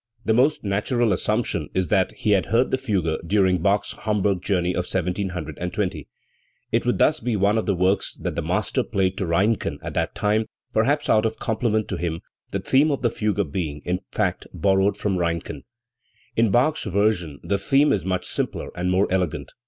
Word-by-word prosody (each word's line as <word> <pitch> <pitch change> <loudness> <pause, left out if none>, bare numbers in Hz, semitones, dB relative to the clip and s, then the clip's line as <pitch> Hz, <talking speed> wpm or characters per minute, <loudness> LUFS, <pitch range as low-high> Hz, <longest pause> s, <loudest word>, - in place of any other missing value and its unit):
The 110 - +3
most 135 +6 +3
natural 105 +3 +1
assumption 105 -6 -1
is 95 -1 0
that 95 -3 +2
he 105 - -1
had 95 -3 +3
heard 120 +4 +2
the - - +2
fugue 95 -11 -1
during 95 -2 +3
Bach's 100 +3 +1
Hamburg 105 -3 0
journey 90 -3 0
of 90 0 -2
1720. 90 -1 -3 0.6
It - - +1
would - - +2
thus - - +3
be 120 -1 -1
one 100 +1 +2
of 110 - -1
the 100 - +2
works 95 +2 +1
that - - -4
the - - -1
master - - 0
played 95 -1 0
to 95 - -1
Reinken 100 +6 +1
at - - -5
that 85 +4 -1
time, 105 +1 +1 0.3
perhaps - - +2
out 110 +1 +4
of 110 - -5
compliment 110 -1 0
to 95 - -2
him, 85 -1 -3 0.3
the - - -2
theme 140 +4 +3
of 140 -3 -2
the 120 - +2
fugue 100 -8 -1
being, 75 -4 -3
in 90 +1 0
fact, - - -1
borrowed 95 +1 +2
from 100 -2 -1
Reinken*. 85 -4 -3 0.7
In 115 -1 +3
Bach's 130 +9 +2
version 95 -7 0
the 100 0 0
theme 140 +8 +3
is 100 - -1
much 95 -1 -2
simpler - - -3
and 90 +1 -2
more 95 +2 +3
elegant. 90 -4 -1
100 Hz, 190 wpm, -23 LUFS, 90-110 Hz, 0.7 s, out